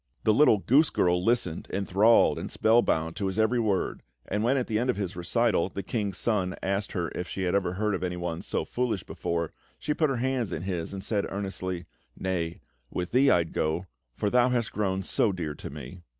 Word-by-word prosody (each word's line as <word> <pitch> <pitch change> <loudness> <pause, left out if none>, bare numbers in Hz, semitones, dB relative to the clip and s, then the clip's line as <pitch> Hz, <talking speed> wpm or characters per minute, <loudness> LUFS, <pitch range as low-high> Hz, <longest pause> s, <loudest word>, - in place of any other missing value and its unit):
The 110 - +4
little 125 -3 +6
goose 140 +10 +4
girl 90 0 +2
listened, 115 -7 +1
enthralled 100 +4 +4
and - - -5
spellbound, 85 -8 +2
to 100 - -1
his 95 - -3
every 110 +3 +3
word; 105 -5 0 0.3
and 105 +2 -1
when, 130 +4 +3
at 125 - 0
the 110 -2 0
end 125 +2 0
of 125 - +2
his 95 -4 -3
recital, 85 0 +1
the 100 - -5
King's 100 -1 -2
Son 95 -5 0
asked 100 +1 -1
her 85 -2 -1
if 90 - -4
she 95 - -4
had 90 - 0
ever 95 -3 +1
heard 105 +2 0
of 95 - -2
anyone 90 -2 -3
so - - -2
foolish 120 -7 -1
before, 85 -2 -3 0.2
she 150 - -1
put 155 -1 +1
her 135 - 0
hands 125 -2 -1
in 80 - -4
his 90 -4 -3
and 95 -1 -6
said 100 -1 0
earnestly: 95 -3 -4 0.3
"Nay; 85 -3 -2 0.3
with 90 0 -4
thee 135 +3 +5
I'd 85 -2 +2
go, 80 +4 -1 0.3
for 105 - -1
thou 125 0 +4
hast 120 -3 0
grown 95 -2 -1
so 105 - +2
dear 85 -5 -4
to - - -8
me!" 75 +5 -9
95 Hz, 210 wpm, -27 LUFS, 90-115 Hz, 0.3 s, little